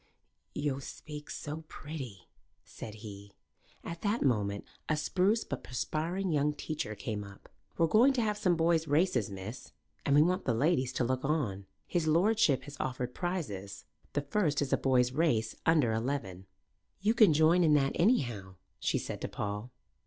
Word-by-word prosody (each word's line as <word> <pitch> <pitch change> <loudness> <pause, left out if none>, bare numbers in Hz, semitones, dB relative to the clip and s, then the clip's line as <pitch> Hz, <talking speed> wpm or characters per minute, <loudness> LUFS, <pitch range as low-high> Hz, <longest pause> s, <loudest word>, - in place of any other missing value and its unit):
"Yo' 145 -2 -1
speak 150 +2 -9
so 155 +2 -5
pretty," 135 - -8 0.4
said 110 -1 -9
he. 100 -1 -9 0.5
At 170 0 -6
that 210 +3 0
moment 105 -6 0 0.2
a 155 - +2
spruce 195 +8 +2
but - - -5
perspiring 165 - -2
young 150 0 +2
teacher 145 -8 -4
came 105 0 -4
up. 100 -1 -13 0.3
"We're 165 - +4
going 225 +11 +5
to 245 -3 +1
have 210 -1 0
some 180 -3 +3
boys' 165 -1 +2
races, 145 - +2
miss, 100 +6 -8 0.3
and 140 - +3
we 150 - +7
want 180 +3 0
the 120 - +1
ladies 135 -1 +2
to 125 - 0
look 130 +1 -1
on. 115 -11 -1 0.2
His 170 -3 -1
lordship 170 - +3
has 145 -1 -10
offered 125 -1 -3
prizes. 100 - -4 0.3
The 145 - +1
first 150 0 0
is 140 -2 0
a - - +5
boys' 125 -2 +3
race 130 -7 +1
under 150 -9 +4
eleven." 110 -6 -3 0.5
"You 210 +3 +3
can 215 -6 +6
join 160 +4 +5
in 155 -2 +5
that, 135 -2 +3
anyhow," 120 - +1 0.2
she - - +1
said - - -5
to - - -2
Paul. 105 +3 -4
145 Hz, 165 wpm, -31 LUFS, 115-165 Hz, 0.5 s, we